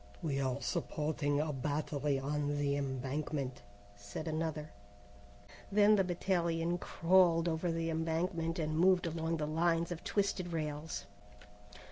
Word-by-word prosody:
"We 140 Hz, -4 st, 0 dB
are 130 Hz, 0 st, 0 dB
supporting 150 Hz, -1 st, -1 dB
a 150 Hz, 0 st, 0 dB
battery 145 Hz, +1 st, -1 dB
on 145 Hz, +1 st, -1 dB
the 140 Hz, -1 st, +1 dB
embankment," 135 Hz, 0 st, -3 dB, 0.3 s
said 100 Hz, +10 st, -7 dB
another. 155 Hz, -1 st, -2 dB, 1.0 s
Then 210 Hz, +1 st, +6 dB
the 195 Hz, -, +3 dB
battalion 175 Hz, -1 st, 0 dB
crawled 170 Hz, -1 st, +4 dB
over 165 Hz, +1 st, 0 dB
the 165 Hz, 0 st, -1 dB
embankment 165 Hz, +1 st, -1 dB
and 155 Hz, -2 st, -1 dB
moved 180 Hz, +2 st, +4 dB
along 165 Hz, 0 st, -1 dB
the 150 Hz, -, -1 dB
lines 165 Hz, +2 st, +1 dB
of 170 Hz, -1 st, -5 dB
twisted 195 Hz, -4 st, 0 dB
rails. 155 Hz, 0 st, -3 dB
160 Hz, 125 wpm, -34 LUFS, 145-170 Hz, 1.0 s, Then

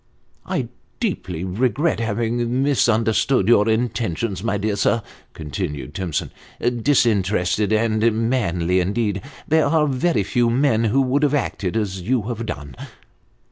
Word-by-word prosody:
" -, -, -39 dB
I -, -, -2 dB, 0.3 s
deeply 90 Hz, -2 st, -3 dB
regret 120 Hz, -, 0 dB
having 120 Hz, +3 st, -1 dB
misunderstood 115 Hz, -4 st, +2 dB
your 115 Hz, -2 st, +5 dB
intentions, 110 Hz, -4 st, -1 dB
my 115 Hz, -3 st, 0 dB
dear 105 Hz, +1 st, -1 dB
sir," 115 Hz, +2 st, +1 dB, 0.3 s
continued 75 Hz, -3 st, -5 dB
Timson. 90 Hz, -5 st, -3 dB, 0.3 s
" -, -, -38 dB
Disinterested 105 Hz, -6 st, +1 dB
and 110 Hz, +1 st, +2 dB, 0.2 s
manly, 90 Hz, -7 st, +1 dB
indeed! 100 Hz, +1 st, -1 dB, 0.3 s
There 160 Hz, 0 st, +3 dB
are 160 Hz, -2 st, +3 dB
very 140 Hz, -, +1 dB
few 120 Hz, +4 st, +1 dB
men 120 Hz, -2 st, +2 dB
who 125 Hz, +6 st, +3 dB
would 135 Hz, +3 st, +1 dB
have 145 Hz, -1 st, +2 dB
acted 110 Hz, -7 st, -2 dB
as 95 Hz, -4 st, -2 dB
you 120 Hz, +4 st, 0 dB
have 115 Hz, 0 st, -4 dB
done." 70 Hz, -, -6 dB
110 Hz, 140 wpm, -21 LUFS, 95-125 Hz, 0.3 s, your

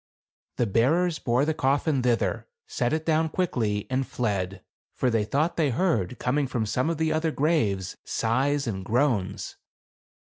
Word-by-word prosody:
The 120 Hz, -, +2 dB
bearers 160 Hz, -, +2 dB
bore 125 Hz, +3 st, +1 dB
the 160 Hz, -, +1 dB
coffin 140 Hz, 0 st, +1 dB
thither, 120 Hz, -2 st, 0 dB, 0.2 s
set 435 Hz, 0 st, -1 dB
it 160 Hz, 0 st, -1 dB
down 160 Hz, 0 st, +2 dB
quickly 115 Hz, -, -1 dB
and 130 Hz, 0 st, -1 dB
fled; 95 Hz, -5 st, -2 dB, 0.3 s
for 125 Hz, -, +1 dB
they 115 Hz, -2 st, +2 dB
thought 150 Hz, +10 st, 0 dB
they 155 Hz, -4 st, +2 dB
heard, 125 Hz, -, 0 dB
coming 140 Hz, +2 st, 0 dB
from 120 Hz, -3 st, -1 dB
some 125 Hz, +8 st, 0 dB
of 165 Hz, -, -1 dB
the 160 Hz, 0 st, +1 dB
other 160 Hz, +1 st, +1 dB
graves, 135 Hz, -, 0 dB
sighs 135 Hz, +5 st, 0 dB
and 95 Hz, -5 st, -3 dB
groans. 110 Hz, -4 st, 0 dB
130 Hz, 155 wpm, -26 LUFS, 115-155 Hz, 0.3 s, The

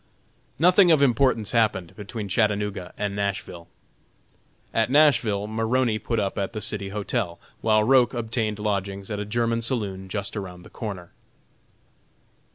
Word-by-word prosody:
Nothing 180 Hz, +3 st, +5 dB
of 155 Hz, -4 st, +5 dB
importance 125 Hz, -4 st, +2 dB
happened 105 Hz, -7 st, +1 dB
between 105 Hz, 0 st, -6 dB
Chattanooga 105 Hz, -2 st, 0 dB
and 100 Hz, -1 st, -2 dB
Nashville. 100 Hz, -4 st, -3 dB, 1.1 s
At 115 Hz, 0 st, +1 dB
Nashville 130 Hz, -8 st, +3 dB
Maroney 115 Hz, +1 st, 0 dB
put 115 Hz, +2 st, -2 dB
up 100 Hz, -1 st, -2 dB
at 100 Hz, +2 st, -2 dB
the 110 Hz, -, -3 dB
City 100 Hz, -2 st, 0 dB
Hotel, 100 Hz, -3 st, -3 dB, 0.2 s
while 110 Hz, -1 st, +3 dB
Roch 125 Hz, +1 st, +4 dB
obtained 110 Hz, -2 st, -2 dB
lodgings 100 Hz, -1 st, -3 dB
at 105 Hz, -, -2 dB
a 105 Hz, -, -3 dB
German 115 Hz, +2 st, 0 dB
saloon 100 Hz, -6 st, -3 dB
just 100 Hz, 0 st, -4 dB
around 90 Hz, -3 st, -6 dB
the -, -, -15 dB
corner. 95 Hz, -6 st, -6 dB
105 Hz, 140 wpm, -25 LUFS, 100-115 Hz, 1.1 s, Nothing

